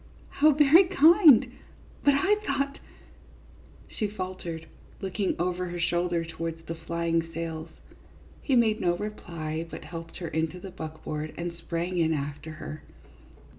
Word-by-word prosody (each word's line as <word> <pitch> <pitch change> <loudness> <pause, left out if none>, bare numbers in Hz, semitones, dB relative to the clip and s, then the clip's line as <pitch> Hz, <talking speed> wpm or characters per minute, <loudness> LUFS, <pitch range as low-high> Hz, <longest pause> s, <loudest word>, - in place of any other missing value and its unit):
How 305 +2 +4
very 300 +5 +7
kind! 315 - +6 0.5
But 285 -1 +5
I 380 +9 +3
thought 280 -7 -1 0.6
" - - -24
She 215 - +1
faltered, 185 -5 -6 0.3
looking 195 0 -1
over 180 +1 -1
her 175 0 -5
shoulder 175 0 0
towards 165 0 -6
the 165 - -4
flying 165 0 -1
sails. 165 -1 -4 0.7
He 270 - +1
made 225 -3 +3
no 175 0 +2
reply, 165 -6 -4
but - - -8
helped 165 +1 -8
her 175 - -5
into 160 +2 -2
the 190 +1 -8
buckboard 155 -2 -6
and 170 0 -3
sprang 170 +1 -3
in 160 -1 +3
after 145 +2 -4
her. 155 0 -8
175 Hz, 140 wpm, -27 LUFS, 165-215 Hz, 0.7 s, very